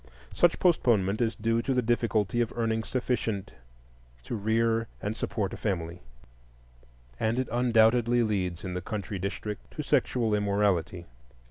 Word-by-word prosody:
Such 175 -1 +3
postponement 110 - +2
is 115 -1 +1
due 115 +1 0
to 135 +2 -1
the 125 - +2
difficulty 115 -2 +1
of 115 - -1
earning 115 -1 0
sufficient 110 -6 -2 0.7
to - - -6
rear 115 +2 +1
and 105 +2 -3
support 100 -4 -2
a - - -5
family; 85 -4 -3 1.2
and 110 +2 0
it 130 -1 0
undoubtedly 120 0 +3
leads, 90 -6 -1
in 90 - -4
the 90 - -3
country 100 0 -4
districts, 100 +2 -5
to - - -3
sexual 115 -4 +1
immorality. 100 -4 0
110 Hz, 140 wpm, -28 LUFS, 100-120 Hz, 1.2 s, Such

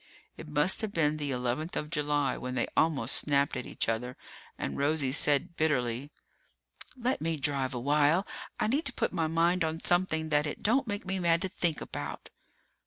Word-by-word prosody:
It 160 - -10
must 150 +8 +4
have 220 -2 -3
been 155 -4 +1
the 145 -2 -3
eleventh 125 +6 -2
of 150 +1 -4
July 145 -3 0
when 125 0 -5
they 120 - +1
almost 145 -6 +4
snapped 140 -1 +2
at 125 - -5
each - - -2
other 125 +3 -2 0.4
and 70 - -4
Rosie 140 -2 +1
said 145 +3 +2
bitterly, 135 -4 0 0.9
"Let 250 +1 -1
me 165 0 -1
drive 135 -2 0
a - - -2
while. 150 - +3 0.3
I - - +1
need 275 +9 0
to 270 - -1
put - - -1
my 165 -3 0
mind 170 +2 +2
on 160 0 -2
something 165 -3 0
that 150 0 +2
it 150 - -6
don't 250 +4 +2
make 205 -1 -4
me 190 +1 -2
mad 170 -1 +2
to 190 - -2
think 170 -4 -2
about!" - - -7
155 Hz, 190 wpm, -29 LUFS, 140-170 Hz, 0.9 s, must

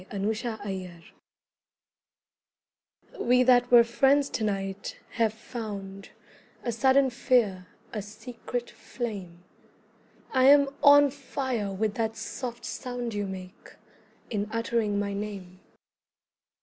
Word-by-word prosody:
WE - - -24
THAT 200 - -5
WERE 210 +3 +1
FRIENDS 200 -7 -6 2.1
We 250 +1 +4
that 245 -1 +4
were 240 -1 +8
friends 270 +4 +3
to 220 - -2
night 195 -1 -3
have 225 -3 +1
found 205 -4 -7 0.5
A 240 - -1
sudden 265 +3 +3
fear, 215 -8 +1 0.3
a 215 - -2
secret 235 +3 -6
flame: 195 -8 -6 0.9
I 260 -1 +4
am 280 0 +7
on 285 -1 +7
fire 260 -6 -3
with 205 +2 -1
that 225 -1 -1
soft 235 +1 -6
sound 245 -2 -4
You 205 -1 -2
make, 185 -1 -10 0.6
in 210 -1 -2
uttering 230 -2 0
my 200 0 -1
name. 200 -3 -6
225 Hz, 115 wpm, -27 LUFS, 200-245 Hz, 2.1 s, were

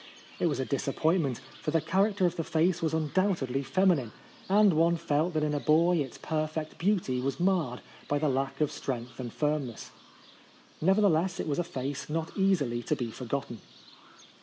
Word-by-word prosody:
It - - +2
was - - -1
a - - 0
disappointment; 160 -7 0 0.2
for - - -2
the 165 +1 +2
character 195 +4 +1
of 175 - +1
the 165 - -2
face 165 +3 +1
was 160 -1 0
undoubtedly 155 -4 0
femi 185 +6 +3
nine— 120 -5 -5 0.4
and 205 -1 +5
one 165 +2 +3
felt 160 +1 0
that 155 - +1
in 150 0 0
a 145 - 0
boy 165 +4 +3
its 135 -6 -3
perfect 155 0 -3
beauty 170 -10 +1
was 135 +4 -2
marred 175 -9 +1 0.3
by 145 - +1
the 150 +1 +1
lack 135 +1 -1
of 150 - +2
strength 125 -1 -5
and 120 -2 -5
firmness. 145 -5 -2 0.9
Nevertheless 190 -1 +3
it - - -2
was 145 +1 -1
a - - +2
face 140 -3 -5
not 160 +1 -3
easily 165 - +1
to - - -1
be 120 -3 -4
forgotten. 125 -1 -4
155 Hz, 180 wpm, -29 LUFS, 135-175 Hz, 0.9 s, and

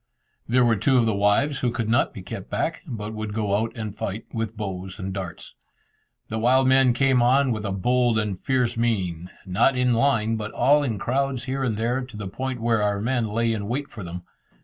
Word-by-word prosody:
There 125 +1 +4
were 115 -2 +3
two 130 +6 +3
of 120 - +4
the 110 - +1
wives 105 +8 +2
who 125 - +1
could 115 -2 -2
not 120 +2 +2
be - - -9
kept - - -7
back, - - -2
but 110 -2 -5
would 110 -1 -5
go 105 -2 0
out 110 +2 0
and 110 -3 -5
fight 105 +2 -4
with 115 -2 -3
bows 95 -2 -5
and 95 0 -4
darts. 95 -3 -7 0.7
The 110 - -3
wild 130 +3 +4
men 130 -1 +5
came 130 0 +3
on 130 +2 +4
with 110 -2 -3
a - - -2
bold 120 +4 +2
and 105 -4 -2
fierce 125 -3 +1
mien, 95 -7 -1 0.2
not 95 +8 +2
in 125 0 +2
a 115 - +2
line, 115 -5 +2
but 105 0 -5
all 145 +4 +4
in 120 -7 -1
crowds 130 +3 -1
here 135 +1 -2
and 115 -5 -1
there, 120 +4 0
to 125 -4 -9
the 105 -2 -5
point 130 +6 -4
were 115 -1 +1
our 105 -1 +1
men 120 +1 0
lay 115 +2 0
in 100 -2 -4
wait 140 +5 -3
for 105 -4 -8
them. 90 +1 -7
115 Hz, 225 wpm, -24 LUFS, 105-125 Hz, 0.7 s, men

